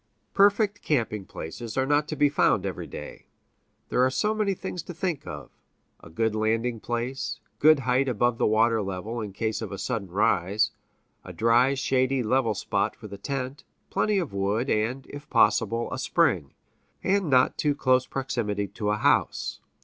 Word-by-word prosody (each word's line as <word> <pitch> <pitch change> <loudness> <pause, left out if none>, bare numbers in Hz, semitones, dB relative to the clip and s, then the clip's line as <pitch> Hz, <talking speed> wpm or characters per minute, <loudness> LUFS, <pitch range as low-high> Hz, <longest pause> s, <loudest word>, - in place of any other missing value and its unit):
Perfect 205 +1 +3
camping 110 -8 -1
places 110 +10 -7
are 130 - +2
not 145 +2 +2
to 155 - -4
be 145 0 +4
found 110 -8 +2
every 95 - -4
day. - - -9 0.6
There 125 - +2
are 130 - +4
so 210 +12 0
many 210 -3 0
things 180 - -5
to 175 - -9
think 170 -4 -3
of - - -8 0.5
a - - -14
good 110 +7 0
landing 115 +2 0
place; 120 +4 -3 0.2
good 155 -1 +6
height 130 +1 +1
above 120 0 +1
the - - +3
water 110 +1 +3
level, 100 +4 -4
in 105 -2 -5
case 110 +3 -2
of - - -5
a 100 - -5
sudden 100 0 -3
rise; 100 0 +1 0.5
a - - -9
dry, 120 +4 +3
shady, 130 -1 +1
level 115 -1 +1
spot 100 +2 -1
for 110 -2 -10
the 100 -1 -9
tent; 135 +3 -4 0.3
plenty 210 -1 +1
of 170 - -2
wood, 100 +6 0
and, 115 +5 0
if 145 +1 -10
possible, 115 +2 +2
a - - -4
spring; 70 - +1 0.5
and 195 -3 +1
not 130 -2 +4
too 145 -2 +1
close 130 -2 +2
proximity 115 -7 -2
to 105 +1 -3
a 105 - +1
house. - - +1
120 Hz, 175 wpm, -26 LUFS, 105-135 Hz, 0.6 s, good